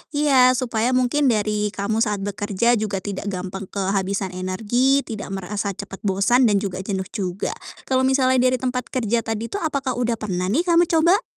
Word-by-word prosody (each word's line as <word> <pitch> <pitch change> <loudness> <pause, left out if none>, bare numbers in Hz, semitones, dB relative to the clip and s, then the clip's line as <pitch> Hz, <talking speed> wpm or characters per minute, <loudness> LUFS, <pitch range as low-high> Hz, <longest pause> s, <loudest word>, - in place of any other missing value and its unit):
Iya, 260 -4 +5
supaya 245 0 0
mungkin 260 +3 +2
dari 210 -2 +1
kamu 210 +3 -1
saat 210 -3 0
bekerja 205 +3 0
juga 200 -3 -3
tidak 205 0 -5
gampang 190 0 -5
kehabisan 195 -1 -1
energi, 220 +9 +1
tidak 215 -3 -6
merasa 200 +1 -3
cepat 200 -1 -8
bosan 225 +6 +3
dan 205 -1 +2
juga 190 -2 -4
jenuh 190 -1 -3
juga. 190 -3 -3 0.3
Kalau 260 0 +1
misalnya 260 -1 +3
dari 255 0 +3
tempat 250 0 -3
kerja 235 -2 0
tadi 225 0 -4
tuh 405 - -2
apakah 275 -5 -2
udah 240 -1 +1
pernah 185 -4 -3
nih 280 - +1
kamu 345 -1 +3
coba? 340 +4 +3
220 Hz, 175 wpm, -22 LUFS, 195-255 Hz, 0.3 s, Iya